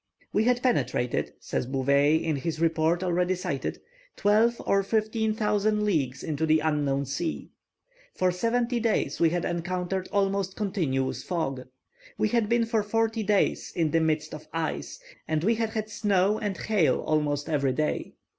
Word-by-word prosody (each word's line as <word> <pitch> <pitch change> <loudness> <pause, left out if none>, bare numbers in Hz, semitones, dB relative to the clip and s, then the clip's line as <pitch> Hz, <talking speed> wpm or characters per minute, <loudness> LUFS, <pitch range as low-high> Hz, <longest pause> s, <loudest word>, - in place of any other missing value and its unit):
"We 215 - +2
had 245 0 +2
penetrated," 125 - 0
says - - -3
Bouvet, 140 +3 +2
in 155 -4 -1
the 160 +4 -3
report 165 +1 +2
already 180 +1 +1
cited, 175 -7 -3 0.4
"twelve 220 +3 +3
or 195 - +3
fifteen 220 +1 0
hundred 210 0 +1
leagues 150 -12 0
into 155 -1 -2
an 155 0 +4
unknown 145 -3 0
sea. 140 +5 -4 0.6
For 185 0 +2
seventy 235 +5 0
days 230 -1 0
we 165 - +5
had 175 +1 -1
encountered 180 +2 -2
almost 195 -1 0
continuous 160 -11 -1
fog. 135 -8 -3 0.5
We 215 - +1
had 230 -3 +1
been 235 0 +3
for 225 -1 +1
forty 225 +2 0
days 205 -1 +1
in 160 -3 +1
the 165 - +3
midst 155 -1 0
of 155 0 -9
ice, 165 - -3 0.3
and 155 0 0
we 225 +5 +3
had 225 -1 -1
had 215 -1 -3
snow 205 -1 +1
and 205 -3 -3
hail 205 -8 +2
almost 150 -1 0
every 140 -4 +1
day. 155 +3 -2
180 Hz, 160 wpm, -27 LUFS, 155-215 Hz, 0.6 s, we